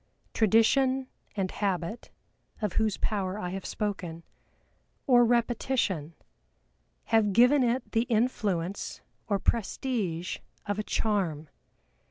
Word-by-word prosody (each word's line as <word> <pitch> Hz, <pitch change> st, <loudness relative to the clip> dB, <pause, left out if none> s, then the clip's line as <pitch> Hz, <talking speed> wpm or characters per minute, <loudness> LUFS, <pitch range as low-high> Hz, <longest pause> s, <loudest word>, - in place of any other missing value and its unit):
Tradition, 255 Hz, +5 st, +3 dB, 0.3 s
and 190 Hz, -2 st, 0 dB
habit 195 Hz, +2 st, -2 dB, 0.5 s
(of 210 Hz, -4 st, -2 dB
whose 220 Hz, -2 st, +1 dB
power 195 Hz, -2 st, -1 dB
I 180 Hz, -4 st, -4 dB
have 190 Hz, 0 st, -5 dB
spoken) 180 Hz, -6 st, -4 dB, 0.8 s
or 245 Hz, -2 st, +6 dB
repetition, 235 Hz, -, 0 dB, 0.9 s
have 215 Hz, -3 st, +2 dB
given 250 Hz, +6 st, +6 dB
it 245 Hz, +1 st, 0 dB
the 230 Hz, +1 st, +1 dB
influence 205 Hz, -6 st, -1 dB, 0.3 s
or 200 Hz, -, +2 dB
prestige 195 Hz, -5 st, -1 dB, 0.3 s
of 205 Hz, 0 st, -2 dB
a -, -, 0 dB
charm. 180 Hz, -10 st, -1 dB
210 Hz, 105 wpm, -28 LUFS, 185-235 Hz, 0.9 s, or